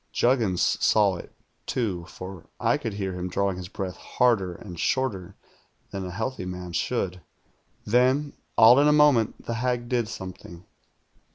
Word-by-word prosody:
"Juggins 115 -8 +1
saw 100 -4 +4
it, - - -10 0.4
too, 95 -9 -2
for 95 -2 -9
I - - +2
could 110 - -4
hear 95 -2 -3
him 90 0 -4
drawing 100 +1 0
his 90 -1 -6
breath 95 -2 -5
harder 100 -8 +1
and 90 -3 -10
shorter 100 -8 -1 0.6
than 95 -2 -4
a - - -6
healthy 110 +1 -4
man 90 -1 -6
should. 90 -1 -1 0.6
"Then, 130 +6 +2 0.2
all 120 +4 +8
in 145 - +5
a - - +6
moment, 145 -7 +3
the 115 - -2
hag 120 0 -1
did 120 -3 +1
something. 95 -4 -9
100 Hz, 155 wpm, -26 LUFS, 90-125 Hz, 0.6 s, all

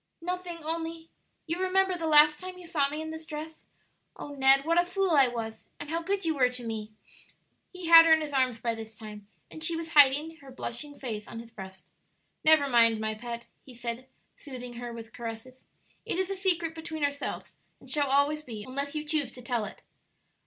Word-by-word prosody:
"Nothing, 350 -1 -5
only 325 +1 -4 0.3
you 335 +3 -3
remember 375 0 +2
the 330 -2 -3
last 300 0 +7
time 370 0 -8
you 360 - -11
saw 295 -5 +1
me 305 +2 -4
in 315 - -6
this 320 0 -8
dress? 315 +1 -8 0.5
Oh, - - -8
Ned, 270 0 +4
what 335 +2 +4
a - - -2
fool 375 +1 -1
I 275 -4 +6
was! 225 -2 -6
and 290 - -7
how 330 +1 -1
good 390 +2 -2
you 325 - +1
were 255 -4 +3
to 250 -1 -5
me!" 220 -1 -5 0.8
He 365 -1 -8
had 330 0 +9
her - - +5
in 320 0 +6
his 300 -2 -5
arms 255 -3 +2
by 230 0 -1
this 220 -1 -9
time, 210 -2 -10 0.2
and 315 - -8
she 330 0 +2
was 330 0 -5
hiding 295 +2 +5
her 275 -3 -14
blushing 270 +3 -7
face 220 -5 -5
on - - -9
his 230 0 -9
breast. 190 -3 -11 0.5
"Never 310 -2 +5
mind, 230 -3 +4
my 220 0 -1
pet," 235 +1 -7 0.2
he 255 - -14
said, 240 +1 -5 0.3
soothing 250 -3 -9
her 240 0 -6
with 230 -1 -10
caresses; 235 +2 -8 0.4
"it - - -3
is 375 +1 0
a - - -2
secret 345 -4 +1
between 320 -1 -6
ourselves, 285 0 -3 0.2
and - - -2
always 285 +1 +2
shall 305 - -16
be, 220 -3 -6
unless 280 +5 -4
you 305 0 -3
choose 295 -4 0
to 250 - -10
tell 240 -3 -1
it." 195 - -11
285 Hz, 210 wpm, -28 LUFS, 240-325 Hz, 0.8 s, had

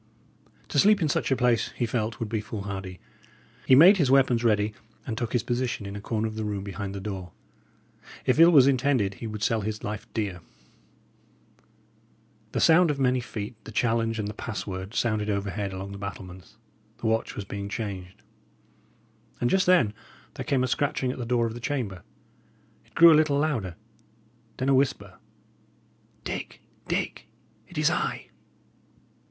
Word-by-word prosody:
To - - +1
sleep 210 0 +5
in 160 -4 +1
such - - 0
a 135 - +3
place, 125 -2 +2
he 120 - -1
felt, 110 -1 -2
would 115 - -2
be 110 0 -2
foolhardy. 100 -3 -6 0.7
He 130 - +7
made 180 +9 +8
his 145 -7 +2
weapons 130 -3 +4
ready, 105 -2 +2 0.3
and 115 - -3
took 115 0 -3
his 120 - 0
position 120 -3 -2
in 100 0 -6
a 100 - -6
corner 110 +1 -1
of 110 - -6
the 110 0 -4
room 105 -2 -3
behind 100 0 -5
the - - -4
door. 95 -3 -6 0.9
If 130 - +2
ill 165 +1 +9
was 145 -7 +7
intended, 130 -6 +2
he 115 - -7
would 105 -1 -5
sell 110 +1 +1
his 105 +1 -4
life 110 +2 -6
dear. 100 -5 -2 2.1
The - - -1
sound 170 +1 +5
of 145 - 0
many 130 -2 +2
feet, 110 -2 -6
the - - -10
challenge, 115 0 0
and 105 -2 -2
the 105 - -5
password, 100 -1 -6
sounded 110 -2 0
overhead 100 0 -2
along 95 +1 -6
the 100 - -8
battlements; 95 0 -9 0.4
the - - -8
watch 110 0 0
was 105 - -5
being 100 0 -5
changed. 100 -3 -6 1.2
And 120 - +1
just 190 0 +2
then 150 - +4 0.4
there - - -6
came 135 -3 +1
a - - +1
scratching 130 -1 0
at 130 - -8
the 120 - -4
door 120 -1 +2
of 115 - -3
the 120 - -7
chamber; 115 -9 -3 0.9
it - - -30
grew 170 0 +9
a 155 - +6
little 145 -2 0
louder; 125 - -1 0.8
then 130 - -2
a - - +5
whisper: 105 -8 0 1.0
"Dick, - - -6 0.2
Dick, - - -2 0.4
it - - -12
is - - +3
I!" - - -2
110 Hz, 175 wpm, -26 LUFS, 100-130 Hz, 2.1 s, ill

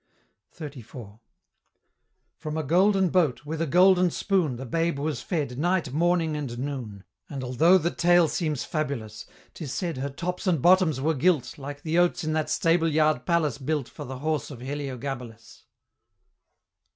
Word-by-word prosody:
XXXIV. 120 -8 -9 1.2
From 155 -1 -5
a 160 - -1
golden 190 +5 +3
boat, 155 -7 +1
with 160 +2 -4
a 165 - 0
golden 180 +3 +5
spoon, 175 -7 0
The 130 +3 -7
babe 165 +3 -1
was 150 +1 -2
fed 145 -8 -3
night, 175 -4 0
morning, 165 0 +1
and 135 -5 -4
noon; 125 -7 -5 0.3
And 135 -2 -5
altho' 155 +9 +4
the 170 -1 -1
tale 175 -1 +4
seems 150 -2 -2
fabulous, 130 -9 -4 0.3
'Tis 150 -6 -7
said 175 -6 -3
her 135 +2 -3
tops 180 +7 -4
and 170 -5 +2
bottoms 175 -2 +4
were 155 +4 +1
gilt, 150 -2 +1
Like 145 +1 -8
the 165 +2 +1
oats 175 -1 +2
in 155 0 -1
that 155 -1 -1
Stable 165 0 +2
yard 150 -4 +1
Palace 155 -7 +1
built 145 -1 -2
For - - -9
the 130 +1 -7
horse 155 +1 -2
of 135 -5 -9
Heliogabalus. 130 -4 -6
155 Hz, 160 wpm, -26 LUFS, 135-170 Hz, 1.2 s, golden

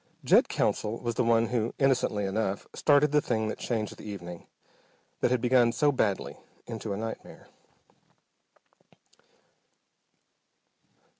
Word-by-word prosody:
Jed - - +4
Counsell 110 +2 -1
was 120 -1 -3
the 125 - 0
one 115 -1 +3
who, 120 -2 -1
innocently 125 -7 +1
enough, 100 0 -2
started 145 0 +3
the 150 0 +3
thing 110 -4 -1
that - - -5
changed 110 -4 -3
the - - -12
evening, 90 -5 -8 0.7
that - - +2
had 125 -1 +1
begun 125 -1 +4
so 145 +5 +2
badly, 95 - -1 0.3
into 110 -2 -6
a 100 - -2
nightmare. 110 +1 -7
115 Hz, 125 wpm, -28 LUFS, 105-125 Hz, 0.7 s, Jed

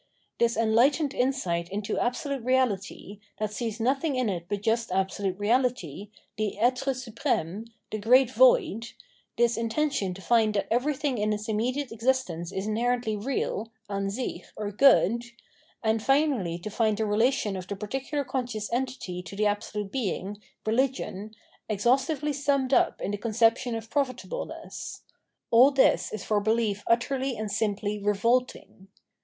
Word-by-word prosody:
This 235 -2 +2
enlightened 255 +7 +3
insight 185 -11 0
iuto 200 +1 -2
absolute 275 +1 -2
Eeahty, 210 -5 -1 0.2
that 215 -1 -3
sees 225 0 -3
nothing 270 +5 +1
in 255 -3 +1
it 175 -3 -4
but 205 -1 -3
just 230 -1 0
absolute 190 0 -1
Eeality, 205 - 0 0.3
the 215 -2 -2
etre 255 +3 +1
supreme, 225 - -2 0.3
the 215 - -3
great 250 +4 +5
Void 400 - +3 0.2
— - - -37
this 235 0 +3
intention 230 -4 -1
to 195 - -10
find 220 -3 +3
that 200 - +1
everything 270 +1 0
in 210 +1 +1
its 210 +1 -3
imme 225 +4 0
diate 285 -3 -3
existence 225 -8 -1
is 190 0 -3
inherently 235 +1 0
real 225 -1 -2 0.2
{an 195 -1 -1
sich) 245 +6 -4
or 210 -1 -3
good, 235 -1 +5 0.6
and 220 0 +1
finally 270 - +2
to 190 +5 -7
find 215 -1 +1
the 220 - 0
relation 215 0 +1
of 185 -1 -6
the 200 - -4
particular 270 +8 -3
con 260 -1 -2
scious 215 -3 -4
entity 240 -8 -3
to 180 +2 -10
the 210 +1 +1
Absolute 205 -1 -2
Being, 205 -4 -3 0.2
Eehgion, 220 -3 -1 0.4
ex 205 -2 -2
haustively 275 +4 +2
summed 275 -1 0
up - - +3
in - - -2
the 205 - -2
conception 230 +2 +2
of 225 0 -7
profitableness 280 - -4 0.3
— - - -22
aU 245 +4 +8
this 275 -2 +3
is 215 -3 -5
for 210 -1 +1
belief 215 -1 0
utterly 260 +2 +1
and 215 -1 -4
simply 210 0 -1
revolting. 210 0 0
225 Hz, 155 wpm, -27 LUFS, 205-260 Hz, 0.6 s, aU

